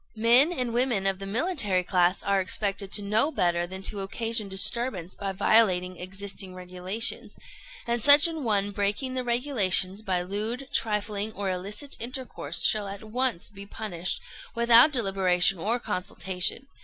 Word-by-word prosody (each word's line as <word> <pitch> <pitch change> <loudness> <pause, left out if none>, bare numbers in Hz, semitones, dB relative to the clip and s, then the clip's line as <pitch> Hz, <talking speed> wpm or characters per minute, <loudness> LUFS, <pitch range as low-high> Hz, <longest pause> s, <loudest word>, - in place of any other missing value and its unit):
"Men 240 +8 +4
and 250 -8 -3
women 240 -5 0
of 195 -1 -1
the 195 - -7
military 215 - +2
class 180 0 +1
are 200 -1 +1
expected 195 +1 -3
to 205 - +1
know 215 +8 +1
better 175 - 0
than 190 +1 -9
to 205 - 0
occasion 220 +2 -1
disturbance 190 -2 0
by 195 -1 -5
violating 185 -2 +1
existing 190 0 -7
regulations; 185 +4 -2 0.5
and 235 0 -2
such 290 +6 +8
an 320 -3 -6
one 205 -3 0
breaking 205 +6 -2
the 255 -1 -3
regulations 220 -6 +2
by 185 -4 -2
lewd, 215 +8 -4
trifling, 210 -1 -2
or 200 -2 -3
illicit 205 +9 -6
intercourse 240 - -2
shall 210 -2 +2
at 200 +1 -9
once 235 -3 -2
be 200 -1 -11
punished, 185 -5 -3 0.4
without 235 +4 +6
deliberation 195 - +1
or 220 +8 -1
consultation. 185 +3 0
200 Hz, 150 wpm, -26 LUFS, 190-235 Hz, 0.5 s, such